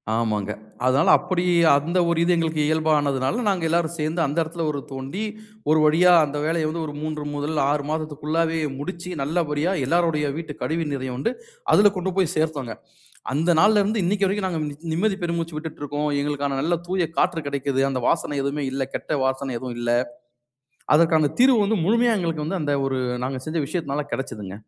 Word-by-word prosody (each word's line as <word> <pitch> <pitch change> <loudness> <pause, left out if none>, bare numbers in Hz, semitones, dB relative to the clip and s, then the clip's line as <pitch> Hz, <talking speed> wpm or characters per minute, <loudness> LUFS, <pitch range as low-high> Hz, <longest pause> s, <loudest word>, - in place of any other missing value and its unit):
ஆமாங்க. 105 -3 -1 0.3
அதனால 135 +5 +3
அப்பிடி 180 -1 -2 0.3
அந்த 170 +6 0
ஒரு 170 - +1
இது 180 - +3
எங்களுக்கு 160 -2 0
இயல்பானதுனால, 150 - +1
நாங்க 190 -4 +1
எல்லாரும் 170 0 +1
சேர்ந்து 155 +3 -1
அந்த 145 +3 -3
இடத்தில 165 +1 -5
ஒரு 145 - -3
தோண்டி, 135 +10 -5 0.5
ஒரு 155 0 +5
வழியா 170 +4 +5
அந்த 145 0 -5
வேலைய 160 -1 0
வந்து 165 +1 -3
ஒரு 145 - -6
3 155 -1 -3
முதல் 145 +2 -2
6 145 -1 0
மாதத்திற்குள்ளாவே 155 +1 -1 0.2
முடிச்சு, 175 +4 -6
நல்லபடியா 155 +2 0
எல்லாருடைய 165 0 +1
வீட்டு 160 -3 -5
கழிவு 165 +1 -1
நீரையும் 130 -2 -4
வந்து, 230 - -1 0.4
அதில 205 0 +6
கொண்டு 185 +1 -2
போய் 180 -2 +2
சேர்த்தோங்க. 150 -7 -1 0.6
அந்த 165 +4 +1
நாள்ல 210 +2 +5
இருந்து 215 0 0
இன்னைக்கி 200 +2 +1
வரைக்கும் 195 0 -1
நாங்க 165 -3 -2 0.3
நிம்மதி 195 +4 0
பெருமூச்சு 170 -2 -2
விட்டுட்டு 155 -1 -8
இருக்கோம், 145 +1 -2
எங்களுக்கான 145 -1 -2
நல்ல 170 +2 +1
தூய 180 -3 0
காற்று 175 -3 +1
கிடைக்கிது, 140 -1 -1
அந்த 130 -2 -2
வாசனை 145 - 0
எதுவுமே 140 +1 -2
இல்ல. 135 0 -2
கெட்ட 145 -3 -2
வாசனை 130 -1 -2
எதுவும் 125 -1 -6
இல்ல. 120 0 -1 1.1
அதற்கான 160 -2 +3
தீர்வு 255 -2 +6
வந்து 215 +1 +1
முழுமையா 235 +3 +3
எங்களுக்கு 165 -3 -2
வந்து 185 +3 -2
அந்த 145 - 0
ஒரு 135 -1 -1 0.2
நாங்க 130 0 -3
செஞ்ச 160 +1 -2
விஷயத்தினால 150 -4 -2
கிடைச்சதுங்க. 105 -7 -5
155 Hz, 175 wpm, -23 LUFS, 140-170 Hz, 1.1 s, அதில